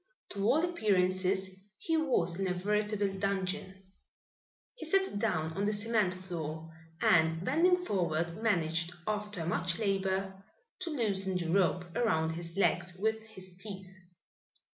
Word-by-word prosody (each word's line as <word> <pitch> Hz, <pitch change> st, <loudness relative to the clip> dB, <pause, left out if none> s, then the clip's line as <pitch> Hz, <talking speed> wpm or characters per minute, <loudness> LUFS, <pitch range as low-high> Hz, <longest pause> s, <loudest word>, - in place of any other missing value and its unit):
To 200 Hz, -1 st, -3 dB
all 310 Hz, +9 st, +4 dB
appearances 190 Hz, -, +1 dB, 0.2 s
he 325 Hz, -, -1 dB
was 195 Hz, -, +1 dB
in 195 Hz, -, 0 dB
a 180 Hz, -, 0 dB
veritable 205 Hz, +1 st, 0 dB
dungeon. 195 Hz, 0 st, -2 dB, 0.9 s
He 480 Hz, -10 st, -8 dB
sat 385 Hz, -, +2 dB
down 160 Hz, -4 st, 0 dB
on 200 Hz, +3 st, -1 dB
the 210 Hz, -, +2 dB
cement 210 Hz, -3 st, +1 dB
floor, 160 Hz, -3 st, -6 dB, 0.3 s
and 160 Hz, +1 st, +4 dB
bending 360 Hz, +6 st, +3 dB
forward, 170 Hz, -, -1 dB
managed, 170 Hz, -5 st, +1 dB
after 210 Hz, -5 st, -3 dB
much 170 Hz, 0 st, 0 dB
labor, 195 Hz, -2 st, -1 dB, 0.4 s
to 365 Hz, -2 st, -4 dB
loosen 195 Hz, -, 0 dB
the 170 Hz, -2 st, -2 dB
rope 180 Hz, -2 st, +3 dB
around 160 Hz, -9 st, +2 dB
his 170 Hz, +2 st, -6 dB
legs 175 Hz, -2 st, +1 dB
with 220 Hz, +3 st, 0 dB
his 185 Hz, -4 st, -10 dB
teeth. 190 Hz, -1 st, -7 dB
190 Hz, 135 wpm, -32 LUFS, 175-210 Hz, 0.9 s, all